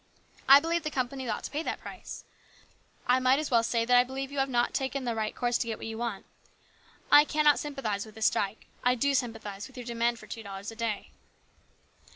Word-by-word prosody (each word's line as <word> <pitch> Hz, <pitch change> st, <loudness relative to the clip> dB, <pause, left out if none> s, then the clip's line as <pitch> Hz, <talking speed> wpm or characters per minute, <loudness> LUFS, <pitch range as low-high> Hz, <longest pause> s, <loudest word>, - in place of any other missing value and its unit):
I 275 Hz, +1 st, +11 dB
believe 335 Hz, +3 st, 0 dB
the 305 Hz, -, -3 dB
companies 260 Hz, -2 st, -3 dB
ought 215 Hz, -, -2 dB
to -, -, -6 dB
pay 295 Hz, -, -2 dB
that -, -, -3 dB
price. -, -, -9 dB, 0.8 s
I 250 Hz, +1 st, +4 dB
might 255 Hz, +1 st, +4 dB
as 305 Hz, -1 st, -3 dB
well 235 Hz, -2 st, +5 dB
say 230 Hz, 0 st, 0 dB
that 245 Hz, +1 st, +4 dB
I -, -, +8 dB
do -, -, -2 dB
not -, -, -16 dB
believe 270 Hz, +1 st, -5 dB
you 285 Hz, -, -3 dB
5(5 270 Hz, -2 st, 0 dB
have 240 Hz, 0 st, +2 dB
taken 270 Hz, 0 st, -2 dB
the 240 Hz, -2 st, -1 dB
right 220 Hz, -1 st, -2 dB
course 240 Hz, -1 st, 0 dB
to -, -, -1 dB
get 225 Hz, -, -3 dB
what -, -, -8 dB
you 225 Hz, 0 st, -5 dB
want. 235 Hz, -5 st, -3 dB, 0.9 s
I 290 Hz, 0 st, +9 dB
cannot 300 Hz, -1 st, +3 dB
sympathise 265 Hz, -9 st, -3 dB
with 215 Hz, -1 st, -13 dB
this 220 Hz, -1 st, -1 dB
strike. 200 Hz, +1 st, 0 dB, 0.2 s
I 250 Hz, 0 st, +4 dB
do 280 Hz, +4 st, +1 dB
sympathise 225 Hz, -5 st, -3 dB
with 265 Hz, -, -17 dB
your 245 Hz, -, -6 dB
demand 235 Hz, 0 st, 0 dB
for -, -, -12 dB
two 225 Hz, -, -7 dB
dollars 200 Hz, 0 st, -7 dB
a -, -, -11 dB
day." 225 Hz, -2 st, -3 dB
245 Hz, 235 wpm, -29 LUFS, 225-270 Hz, 0.9 s, I